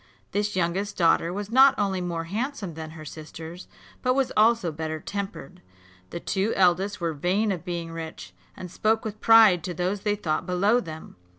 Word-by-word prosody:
This 205 0 -1
youngest 185 +3 -1
daughter 170 0 +3
was 205 +3 -5
not 270 +2 +7
only 195 -3 0
more 170 -2 -3
handsome 210 - -4
than 160 0 -7
her 155 - -9
sisters, 160 +3 -9 0.3
but 255 0 +1
was 270 -2 +1
also 220 -5 +3
better 155 0 -4
tempered. 200 -6 -6 0.5
The - - -5
two 195 +5 -1
eldest 190 +2 +2
were 170 -2 -1
vain 190 +8 0
of 180 -3 -4
being 170 -2 -4
rich, 160 - -8 0.2
and 180 -2 -8
spoke 220 +4 +1
with 215 -1 -6
pride 220 -7 +6
to 180 - -4
those 185 +4 -1
they 210 0 0
thought 165 -3 -2
below 200 +6 +3
them. 160 - -9
185 Hz, 180 wpm, -25 LUFS, 165-210 Hz, 0.5 s, not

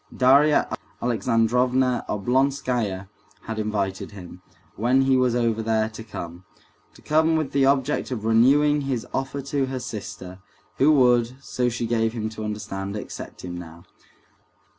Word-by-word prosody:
Darya 140 +4 +5 0.3
Alexandrovna 125 +2 +1
Oblonskaya 120 -3 0 0.3
had 110 -1 -5
invited 100 -2 -2
him, 90 -2 -11 0.3
when 125 +4 +2
he 135 0 +3
was 125 -2 +2
over 115 -2 +1
there, 110 0 +1
to 110 0 -9
come; 85 -5 -8 0.5
to - - -18
come 160 +1 +3
with 155 -3 -1
the 135 -1 +3
object 140 +2 +1
of 115 -5 -4
renewing 140 +6 +4
his 135 -4 -2
offer 135 +1 -3
to 140 0 -1
her 130 0 -4
sister, 105 -6 -7 0.4
who 145 +3 +5
would, 125 -3 +3
so 125 -2 -1
she 120 0 -3
gave 115 -1 0
him 110 -2 -3
to 110 0 -7
understand, 100 -2 -4
accept 105 - -8
him 90 -1 -6
now. 85 -1 -10
120 Hz, 145 wpm, -24 LUFS, 105-135 Hz, 0.5 s, Darya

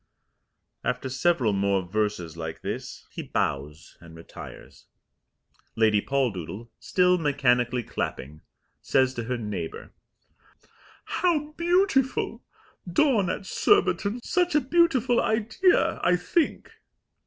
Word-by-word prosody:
After 125 +2 -2
several 130 -5 +1
more 100 -1 +1
verses 90 -3 -2
like 80 -1 -6
this - - -6
he - - -6
bows 75 +4 -3
and 85 -1 -13
retires. 80 - -12 0.9
Lady 110 -2 +3
Poldoodle, 115 - -2
still 180 -1 +2
mechanically 125 -5 +1
clapping, 75 - -5 0.4
says 130 -1 +2
to 120 -3 -5
her 125 +1 -2
neighbour: 105 -7 -6 1.1
"How 310 -4 0
beautiful! 340 -5 +1 0.5
Dawn 220 - +3
at 195 - -4
Surbiton! 195 +5 +2
Such 355 -3 +1
a 300 - +5
beautiful 270 -4 +3
idea, 230 - +2
I 180 +1 +4
think." 300 - -1
135 Hz, 105 wpm, -26 LUFS, -, 1.1 s, a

